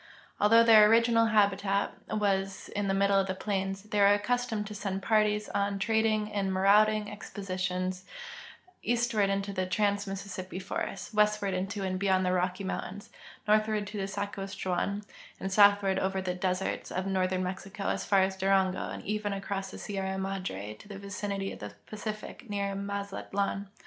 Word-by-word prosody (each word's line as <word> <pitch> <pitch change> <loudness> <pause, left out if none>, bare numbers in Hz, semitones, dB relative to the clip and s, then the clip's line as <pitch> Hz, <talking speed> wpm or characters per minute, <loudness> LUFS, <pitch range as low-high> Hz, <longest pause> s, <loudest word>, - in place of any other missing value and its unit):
Although 225 +3 +6
their 215 -2 +8
original 230 0 +4
hal)itat 200 -2 +2 0.3
was 195 -1 -1
in 205 -1 -2
the 195 - +1
middle 195 0 +3
plains, 195 0 -2
they 210 -1 -2
were 200 0 +7
accustomed 225 0 -1
to 210 - -7
send 195 -2 -4
parties 210 -1 +2
on 200 0 0
trading 215 +1 +1
and 195 -2 0
ma 190 0 -1
rauding 210 +2 +4
expeditions 185 -3 -3 0.8
eastward 235 -4 +1
into 195 0 -1
the 185 -1 -1
trans 205 +1 +1
Mississippi 190 -1 -6
forests, 195 +2 -4
Avestward 210 -2 +2
into 195 +2 -2
and 185 -1 -2
be3''ond 190 -1 +3
the 180 - +1
Rocky 185 +1 0
mountains, 195 +1 -5 0.4
nortliAvard 215 0 +2
to 210 +1 -7
the 195 - -2
SaskatcheAA'an, 200 0 -3 0.3
and 190 - -3
soutliAvard 200 -1 +5
over 190 0 0
the 185 -1 -2
deserts 185 +1 -2
of 185 +1 -2
northern 185 -1 0
Mexico 195 +2 -4
as - - -1
far 195 -2 +4
as 190 0 -1
Durango, 190 -1 +1
and - - -7
even 210 0 -1
across 195 0 -4
tlie - - -8
Sierra 190 -2 -3
Madre 190 - -4
to - - -14
the 200 -1 -8
vicinity 200 0 -4
of - - -9
the 105 0 -8
Pacific, 215 +2 -7
near 200 -1 -1
Mazatlan. 200 0 -3
200 Hz, 160 wpm, -29 LUFS, 190-210 Hz, 0.8 s, their